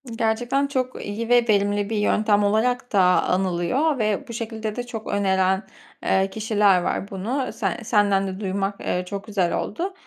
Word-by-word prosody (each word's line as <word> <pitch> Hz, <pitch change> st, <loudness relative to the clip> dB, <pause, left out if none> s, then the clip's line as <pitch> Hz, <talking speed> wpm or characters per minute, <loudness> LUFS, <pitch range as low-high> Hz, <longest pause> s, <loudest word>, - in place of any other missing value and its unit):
Gerçekten 240 Hz, +5 st, 0 dB
çok 255 Hz, -2 st, -3 dB
iyi 225 Hz, +3 st, -4 dB
ve 245 Hz, -1 st, +5 dB
verimli 205 Hz, 0 st, +2 dB
bir 220 Hz, -, -1 dB
yöntem 210 Hz, 0 st, +2 dB
olarak 245 Hz, +5 st, +1 dB
da 200 Hz, -, +5 dB, 0.2 s
anılıyor 190 Hz, -, 0 dB
ve 215 Hz, -2 st, -1 dB
bu 235 Hz, -, -7 dB
şekilde 220 Hz, -1 st, -4 dB
de 245 Hz, -, -3 dB
çok 225 Hz, -2 st, -7 dB
öneren, 190 Hz, -1 st, +1 dB, 0.4 s
eee, 190 Hz, 0 st, +2 dB
kişiler 210 Hz, -3 st, +2 dB
var 195 Hz, +2 st, -2 dB
bunu. 240 Hz, +7 st, -3 dB
Se 205 Hz, -6 st, -2 dB
senden 205 Hz, -3 st, +2 dB
de 190 Hz, 0 st, -5 dB
duymak, 195 Hz, 0 st, -2 dB
eee, 180 Hz, -, -1 dB
çok 200 Hz, +2 st, -6 dB
güzel 195 Hz, -5 st, 0 dB
oldu. 360 Hz, -, -3 dB
210 Hz, 165 wpm, -23 LUFS, 195-230 Hz, 0.4 s, ve